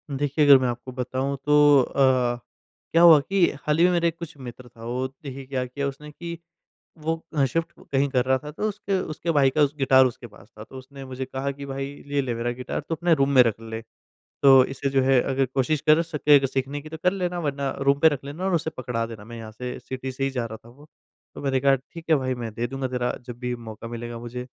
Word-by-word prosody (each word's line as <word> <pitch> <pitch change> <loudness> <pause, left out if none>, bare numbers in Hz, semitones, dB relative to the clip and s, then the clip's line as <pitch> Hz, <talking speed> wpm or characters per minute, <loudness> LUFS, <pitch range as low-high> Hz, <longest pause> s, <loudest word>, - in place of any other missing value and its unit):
देखिए, 145 +2 +1
अगर 140 -1 +9
मैं 130 -1 0
आपको 120 +1 -5
बताऊँ 130 +2 -3
तो 145 -2 +6
अ, 130 -2 +2 0.6
क्या 165 - +4
हुआ 165 -3 +9
कि 190 +5 +2 0.2
हाल 150 0 +1
ही 170 - +4
में 180 - +4
मेरा 170 -1 +2
एक 165 0 -3
कुछ 165 -3 -8
मित्र 125 -1 -10
था, 115 -1 -15
वो 125 +2 -2
देखिए 135 0 -10
क्या 130 -1 -2
किया 140 +3 -3
उसने 150 +2 -8
कि 170 +2 -7 0.6
वो 160 +1 -1 0.2
ह 140 - +4
शिफ़्ट 165 +6 -2 0.2
कहीं 140 +1 +2
कर 125 -2 +1
रहा 130 0 +2
था, 150 +2 -9
तो 210 +8 -2
उसके 200 -2 -2
उसके 160 0 -4
भाई 140 -3 +4
का 150 +3 +2
उस 145 0 +1
गिटार 130 -1 +5
उसके 120 0 -6
पास 105 -2 -17
था, 105 - -8
तो 130 - -13
उसने 135 +1 -11
मुझे 130 0 -5
कहा 130 +1 -3
कि 140 0 -8
भाई 135 0 -4 0.2
ये 145 0 0
ले 125 -3 -2
मेरा 115 +1 -2
गिटार 125 +1 -4
तू 165 - 0
अपने 170 +1 +2
रूम 140 -2 +1
में 130 -2 +8
रख 115 -3 +1
ले। 110 0 -6 0.6
तो 135 -1 +8
इससे 135 +1 -3
जो 135 0 +2
है 130 -1 +4
अगर 135 +1 0
कोशिश 135 +2 +1
कर 155 +2 +5
सके 150 -3 +3
अगर 135 - 0
सीखने 135 +2 -3
की 155 - -11
तो 160 - -7
कर 180 - +4
लेना 180 -2 -2
वरना 140 -3 -2
रूम 140 +1 +2
पे 160 - +6
रख 145 -3 -4
लेना 145 +6 -6
और 190 - 0
उसे 160 -1 0
पकड़ा 120 -2 -2
देना, 115 -2 -9
मैं 115 +1 -9
यहाँ 110 -1 -8
से 125 +3 -6
सिटी 130 0 -6
से 130 +1 -4
ही 135 - +1
जा 125 -3 -3
रहा 110 -1 -7
था - - -14
वो, 145 +5 -17 0.5
तो - - -8
मैंने 135 -2 +1
कहा, 135 +1 +4
"ठीक 160 +5 -11
है, 160 - +6
भाई 130 -2 -1
मैं 120 -2 -5
दे 120 +2 -2
दूँगा 135 +1 -3
तेरा 125 -1 -2
जब 120 -1 -7
भी 125 0 -3
मौका 115 -1 -9
मिलेगा 120 0 -6
मुझे।" 120 +1 -6
135 Hz, 255 wpm, -24 LUFS, 125-150 Hz, 0.6 s, अगर